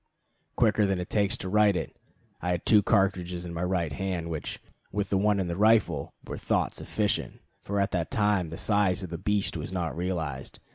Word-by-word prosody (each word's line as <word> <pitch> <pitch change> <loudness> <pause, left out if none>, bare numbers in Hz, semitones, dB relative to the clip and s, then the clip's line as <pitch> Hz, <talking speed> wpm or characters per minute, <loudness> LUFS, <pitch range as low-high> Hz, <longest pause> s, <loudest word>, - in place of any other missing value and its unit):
Quicker 110 -3 +3
than 95 -1 +1
it 90 - -5
takes 100 -2 +2
to 95 - -6
write 105 0 +4
it, - - -3 0.5
I 90 - -2
had 90 -1 -1
two 105 -2 +6
cartridges 95 -4 +1
in 85 - -6
my 85 - -4
right 90 -4 0
hand, 90 -2 -3
which, 80 - -4 0.3
with 100 -1 -2
the 100 - +3
one 105 0 +2
in 95 - 0
the 85 - -2
rifle, 100 -8 +2
were - - -6
thought - - 0
sufficient, 105 -2 -2 0.2
for 100 0 -2
at 100 0 +1
that 85 -2 -1
time 105 -6 +1
the 80 - -7
size 100 -3 +2
of 90 - -7
the 85 - -4
beast 105 -3 0
was 80 +3 -5
not 90 -3 -2
realized. 80 -7 -3
95 Hz, 205 wpm, -28 LUFS, 85-105 Hz, 0.5 s, two